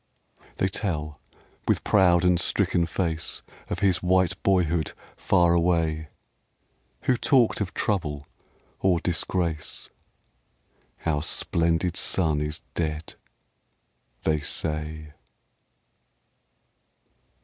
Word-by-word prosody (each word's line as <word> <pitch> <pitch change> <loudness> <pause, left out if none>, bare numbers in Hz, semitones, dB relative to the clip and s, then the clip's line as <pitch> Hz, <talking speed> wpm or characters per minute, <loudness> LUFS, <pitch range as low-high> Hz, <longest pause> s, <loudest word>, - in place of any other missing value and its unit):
They 95 - +1
tell, 80 -7 -3 0.5
with - - +2
proud 90 -3 +4
and 90 -1 +4
stricken 85 -1 +1
face, 85 -2 -2 0.3
Of - - -3
his 95 -3 +3
white 95 0 +3
boyhood 85 -4 +1 0.2
far 85 -1 +3
away 80 -2 +1 1.0
Who 130 - +3
talked 120 -3 +3
of 95 - -3
trouble 75 -8 -1 0.5
or 90 -3 +3
disgrace? 85 -2 -2 0.5
" - - -32
Our 75 -3 +1
splendid 85 +2 0
son 80 -5 +1
is 75 +1 -3
dead! 80 -1 -3 0.5
" - - -43
they 80 -1 +2
say. 75 0 -3
85 Hz, 95 wpm, -26 LUFS, 80-90 Hz, 1.0 s, proud